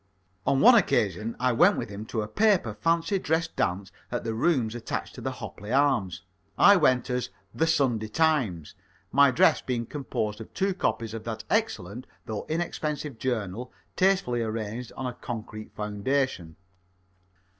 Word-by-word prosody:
On 135 Hz, -, +3 dB
one 250 Hz, -, +9 dB
occasion 115 Hz, -, +2 dB
I 125 Hz, 0 st, +2 dB
went 180 Hz, -, +5 dB
with -, -, -4 dB
him 105 Hz, +2 st, -7 dB
to 110 Hz, -2 st, -2 dB
a -, -, -5 dB
paper 200 Hz, -, +2 dB
fancy 165 Hz, -, +1 dB
dress 165 Hz, 0 st, 0 dB
dance 95 Hz, -, -2 dB, 0.2 s
at -, -, -2 dB
the 115 Hz, -, -2 dB
rooms 120 Hz, -2 st, +1 dB
attached 120 Hz, -1 st, -4 dB
to -, -, -9 dB
the -, -, -3 dB
Hopley 105 Hz, +3 st, -8 dB
Arms. 130 Hz, -11 st, +1 dB, 0.3 s
I 205 Hz, -, +8 dB
went 130 Hz, -9 st, +2 dB
as 125 Hz, 0 st, -1 dB, 0.2 s
"The 160 Hz, -, +1 dB
Sunday 130 Hz, -9 st, +1 dB
Times," 115 Hz, -, 0 dB, 0.4 s
my 140 Hz, 0 st, +6 dB
dress 125 Hz, -, +4 dB
being 120 Hz, -2 st, -2 dB
composed 115 Hz, -6 st, -4 dB
of 110 Hz, -, -10 dB
two 195 Hz, 0 st, +1 dB
copies 115 Hz, -, -2 dB
of 115 Hz, -, -6 dB
that 110 Hz, -1 st, -4 dB
excellent, 125 Hz, -, -1 dB, 0.2 s
though 110 Hz, -2 st, -5 dB
inexpensive 150 Hz, -5 st, -3 dB
journal, 120 Hz, -1 st, -3 dB, 0.2 s
tastefully 185 Hz, -11 st, +2 dB
arranged 110 Hz, +1 st, -4 dB
on 130 Hz, -, -4 dB
a 125 Hz, -, -3 dB
concrete 110 Hz, -5 st, -7 dB
foundation. 105 Hz, -, -2 dB
125 Hz, 155 wpm, -27 LUFS, 110-155 Hz, 0.4 s, one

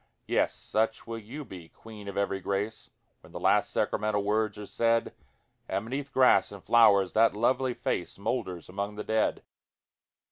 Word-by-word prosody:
Yes, -, -, +1 dB
such 110 Hz, +1 st, -1 dB
will 115 Hz, 0 st, -5 dB
you 130 Hz, +8 st, -8 dB
be, 90 Hz, -6 st, -11 dB
Queen 110 Hz, -2 st, -12 dB
of 100 Hz, 0 st, -6 dB
every 100 Hz, -1 st, 0 dB
grace! 100 Hz, +3 st, -3 dB, 0.3 s
When -, -, -18 dB
the -, -, -5 dB
last -, -, +3 dB
sacramental 105 Hz, -1 st, 0 dB
words 110 Hz, +1 st, 0 dB
are 105 Hz, -, -7 dB
said; 115 Hz, +2 st, +1 dB, 0.6 s
And 100 Hz, -, -2 dB
beneath 135 Hz, +3 st, -4 dB
grass 130 Hz, -1 st, +4 dB
and 100 Hz, -2 st, -10 dB
flowers 100 Hz, -5 st, +5 dB
that 110 Hz, -1 st, +4 dB
lovely 125 Hz, +2 st, +1 dB
face 120 Hz, -7 st, -3 dB
Moulders 100 Hz, -5 st, -3 dB
among 100 Hz, +2 st, -4 dB
the 105 Hz, -, -5 dB
dead. 110 Hz, 0 st, 0 dB
110 Hz, 165 wpm, -28 LUFS, 100-115 Hz, 0.6 s, flowers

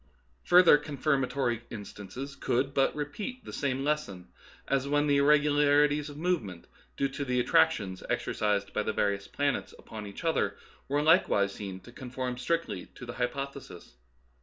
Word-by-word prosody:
Further 175 Hz, -4 st, +7 dB
confirmatory 135 Hz, -4 st, 0 dB
instances 115 Hz, +6 st, -8 dB
could 135 Hz, +3 st, 0 dB
but 135 Hz, -1 st, +2 dB
repeat 205 Hz, -, -5 dB
the -, -, -8 dB
same 135 Hz, -2 st, -1 dB
lesson, 140 Hz, -12 st, -2 dB, 0.4 s
as 135 Hz, 0 st, 0 dB
when 145 Hz, +1 st, +2 dB
the 145 Hz, -1 st, +3 dB
irregularities 145 Hz, 0 st, +4 dB
of 145 Hz, -, -10 dB
movement, 150 Hz, -, -2 dB, 0.3 s
due 140 Hz, -, +1 dB
to 135 Hz, +1 st, -4 dB
the 125 Hz, -2 st, 0 dB
attractions 95 Hz, -5 st, +2 dB
exercised 105 Hz, -1 st, -1 dB
by -, -, 0 dB
the 110 Hz, -, -2 dB
various 100 Hz, -1 st, 0 dB
planets 145 Hz, -1 st, -2 dB
upon 105 Hz, -2 st, -9 dB
each 100 Hz, -, -9 dB
other, 165 Hz, -1 st, 0 dB, 0.3 s
were 145 Hz, +2 st, +1 dB
likewise 125 Hz, -, +4 dB
seen 95 Hz, -2 st, -7 dB
to 105 Hz, -, -14 dB
conform 125 Hz, 0 st, -5 dB
strictly 160 Hz, -, -2 dB
to 125 Hz, -, -9 dB
the 120 Hz, -, -6 dB
hypothesis. 135 Hz, -, -5 dB
135 Hz, 150 wpm, -29 LUFS, 110-145 Hz, 0.4 s, Further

